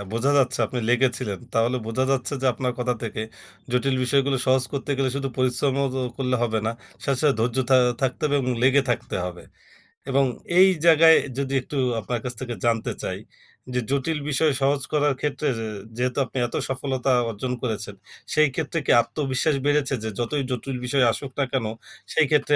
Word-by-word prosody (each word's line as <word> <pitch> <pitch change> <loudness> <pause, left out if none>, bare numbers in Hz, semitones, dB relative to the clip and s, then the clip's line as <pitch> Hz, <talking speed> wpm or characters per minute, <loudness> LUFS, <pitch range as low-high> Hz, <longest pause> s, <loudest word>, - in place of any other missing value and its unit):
বোঝা 120 +5 +1
যাচ্ছে 130 -1 +2
আপনি 125 - -4
লেগেছিলেন। 125 -5 +1
তাহলে 115 +3 +2
বোঝা 115 +4 0
যাচ্ছে 135 +1 0
যে - - +2
আপনার 125 +1 -2
কথা 125 0 0
থেকে 110 -1 -3 0.5
জটিল 130 +2 +1
বিষয়গুলো 135 +2 +2
সহজ 130 0 +3
করতে 140 0 -4
গেলে 135 -1 +1
শুধু 135 -1 -2
পরিশ্রম 130 +1 +1
ও - - +2 0.3
করলে 130 -2 0
হবে 110 -2 +1
না, 110 - 0 0.3
সাথে, 135 -2 0
সাথে, 145 -3 +4
ধৈর্য 120 +2 0
থা 130 - +7 0.3
থাকতে 130 -1 -1
হবে 145 - +3
এবং 125 - -1
লেগে 135 +2 +5
থাকতে 120 - -2
হবে। 90 -1 -6 0.7
এবং 135 +1 +3 0.4
এই 190 - +9 0.2
জায়গায় 160 0 +7 0.2
যদি 140 -1 -2
একটু 140 +3 -6 0.2
আপনার 120 +3 -3
কাছ 125 - -3
থেকে 125 -2 -4
জানতে 115 -1 +1
চাই, - - -3 0.5
যে 125 - +1
জটিল 140 +3 0
বিষয় 150 +1 +3
সহজ 140 0 +2
করার 145 -1 +3
ক্ষেত্রে 150 0 -2
যে 110 - -3 0.3
যেহেতু 125 0 -1
আপনি 130 - -9
এত - - -8
সফলতা 135 0 -1 0.2
অর্জন 125 +4 -4
করেছেন। 105 -4 -3 0.4
সেই 155 0 +5
ক্ষেত্রে 160 +1 -1
কি - - +3
আত্মবিশ্বাস 135 +3 -1
বেড়েছে? 145 -1 +2
যে 110 - -2
যতই 135 +4 -1
জটিল 125 +1 -3
বিষয় 135 +1 +2
আসুক 135 +3 -5
না - - +3
কেন 130 -4 0 0.5
সেই 160 - +4
ক্ষেত্রে 150 -1 +3
130 Hz, 185 wpm, -24 LUFS, 125-140 Hz, 0.7 s, এই